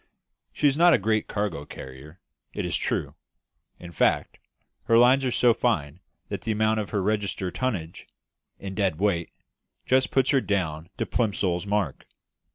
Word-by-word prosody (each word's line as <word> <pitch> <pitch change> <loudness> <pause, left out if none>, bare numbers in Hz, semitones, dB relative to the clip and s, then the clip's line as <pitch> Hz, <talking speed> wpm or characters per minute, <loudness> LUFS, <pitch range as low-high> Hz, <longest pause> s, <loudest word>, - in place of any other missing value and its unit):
She 150 - +1
is 140 - +2
not 170 +2 +6
a - - +3
great 110 +1 0
cargo 100 -8 -3
carrier, 70 +5 -11 0.3
it - - -3
is - - -2
true; - - -2 0.6
in 85 -1 -10
fact, 80 - 0 0.5
her 115 - +4
lines 125 +3 +5
are 125 - 0
so 120 -1 +4
fine 90 - -1 0.3
that 100 -2 -4
the 110 - -2
amount 110 +1 +1
of 105 - -4
her 100 -3 -1
register 100 -3 -1
tonnage, 95 -11 -4 0.5
in 95 -1 -7
dead 95 -5 0
weight, 95 -5 0 0.6
just 130 +1 +2
puts 135 +1 +2
her 135 -3 +3
down 85 -6 -2
to - - -1
Plimsoll's 100 -5 -1
mark. 100 -8 -2
100 Hz, 165 wpm, -25 LUFS, 85-115 Hz, 0.6 s, not